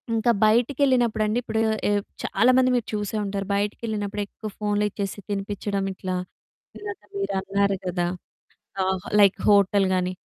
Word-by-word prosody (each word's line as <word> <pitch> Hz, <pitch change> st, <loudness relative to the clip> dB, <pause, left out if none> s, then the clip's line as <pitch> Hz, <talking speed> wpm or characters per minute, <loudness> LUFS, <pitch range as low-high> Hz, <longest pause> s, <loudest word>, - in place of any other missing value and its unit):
ఇంకా 225 Hz, +1 st, +3 dB
బయటికెళ్ళినప్పుడండి 235 Hz, -2 st, +2 dB
ఇప్పుడు 220 Hz, -2 st, -1 dB, 0.3 s
ఆహ్, 205 Hz, 0 st, +2 dB, 0.2 s
చాలామంది 255 Hz, +5 st, +4 dB
మీరు 240 Hz, -, 0 dB
చూసే 210 Hz, 0 st, -2 dB
ఉంటారు 195 Hz, -1 st, -3 dB
బయటికేళ్ళినప్పుడు 205 Hz, 0 st, -2 dB
ఎక్కువ 215 Hz, +2 st, -8 dB
ఫోన్‌లిచ్చేసి 205 Hz, -1 st, -1 dB
తినిపిచ్చడం 200 Hz, 0 st, -2 dB
ఇట్లా, 185 Hz, 0 st, -4 dB, 0.6 s
ఇందాక 410 Hz, -2 st, -7 dB
మీరన్నారు 200 Hz, -, 0 dB
కదా! 175 Hz, -1 st, 0 dB, 0.8 s
ఆహ్, 190 Hz, -1 st, -1 dB, 0.2 s
లైక్ 200 Hz, -1 st, +5 dB
హోటల్ 200 Hz, -1 st, +5 dB
గాని 185 Hz, 0 st, 0 dB
205 Hz, 115 wpm, -24 LUFS, 195-225 Hz, 0.8 s, లైక్